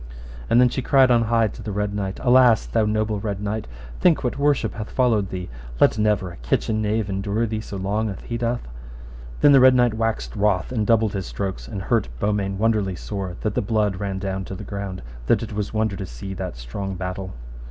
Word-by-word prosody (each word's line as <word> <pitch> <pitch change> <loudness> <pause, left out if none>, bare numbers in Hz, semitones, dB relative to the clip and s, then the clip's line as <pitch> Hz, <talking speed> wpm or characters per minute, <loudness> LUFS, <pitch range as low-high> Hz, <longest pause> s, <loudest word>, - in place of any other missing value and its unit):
And 120 - +5
then 125 - +7
she 130 - -2
cried 130 0 +4
on 115 -1 +4
high 115 -1 +2
to - - -10
the 105 - -5
Red 105 0 -1
Knight, 95 -2 -3
Alas, 125 -2 +5
thou 110 -2 +1
noble 110 0 0
Red 100 -2 -3
Knight, 105 +1 -3 0.3
think 170 -5 +3
what 125 +2 -2
worship 145 -1 +2
hath 110 -1 -6
followed 110 -7 +2
thee, 90 -1 -5 0.3
let - - +4
never 105 -4 +1
a - - -12
kitchen 110 - 0
knave 105 0 0
endure 100 +3 -1
thee 110 -1 -3
so 100 - -7
long 105 +3 -1
as 95 - -6
he 120 - -5
doth. 120 - -2 0.7
Then 145 - +7
the 135 - +8
Red 130 0 +7
Knight 120 -2 +3
waxed 115 0 -2
wroth 100 -3 +1
and 110 -4 -1
doubled 110 -2 +3
his 95 -2 -3
strokes, 95 -12 -4
and 95 +7 -5
hurt - - +1
Beaumains 100 0 0
wonderly 105 -3 +1
sore, 95 -1 -5
that 110 - -1
the - - 0
blood 105 -2 0
ran 100 -2 -3
down 95 0 -3
to 95 - -6
the 105 - -8
ground, 100 - -5 0.2
that - - +3
it 110 - -6
was 105 -1 -3
wonder 110 -2 0
to 95 -1 -5
see 80 +9 -7
that 95 -10 -5
strong 95 +12 -5
battle. 95 +1 -5
105 Hz, 220 wpm, -23 LUFS, 95-115 Hz, 0.7 s, the